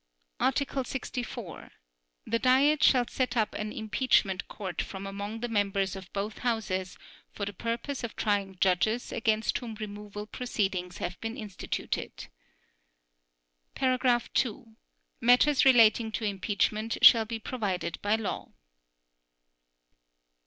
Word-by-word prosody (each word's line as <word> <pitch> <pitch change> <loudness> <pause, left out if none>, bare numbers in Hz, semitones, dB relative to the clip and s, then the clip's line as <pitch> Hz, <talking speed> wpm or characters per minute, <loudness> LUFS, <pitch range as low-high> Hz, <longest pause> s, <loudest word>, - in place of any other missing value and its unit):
Article 270 0 0
64. 245 - -6 0.5
The 230 - 0
Diet 275 +5 +4
shall 250 -2 +5
set 250 -1 -1
up 220 -2 +1
an 210 0 -4
impeachment 210 -3 +1
court 190 -5 -4
from 195 0 -6
among 200 +3 -5
the 240 - -1
members 200 -3 0
of 190 -1 -10
both 200 +2 -4
Houses 190 -6 -2 0.4
for 200 - -3
the 205 - -5
purpose 235 +7 -3
of 235 - -5
trying 200 -2 -1
judges 195 +6 +1
against 220 -1 +1
whom 230 -3 -7
removal 210 -1 -7
proceedings 195 -6 -2
have 180 0 -5
been 225 +2 -4
instituted. 210 -6 -5 1.5
(2) 250 -2 0 0.5
Matters 250 +4 +5
relating 230 -3 +6
to 225 - -3
impeachment 210 +2 -1
shall 225 -2 +9
be 225 +1 -4
provided 205 -7 -3
by 205 +1 +2
law. 220 -3 -4
220 Hz, 115 wpm, -29 LUFS, 200-240 Hz, 1.5 s, shall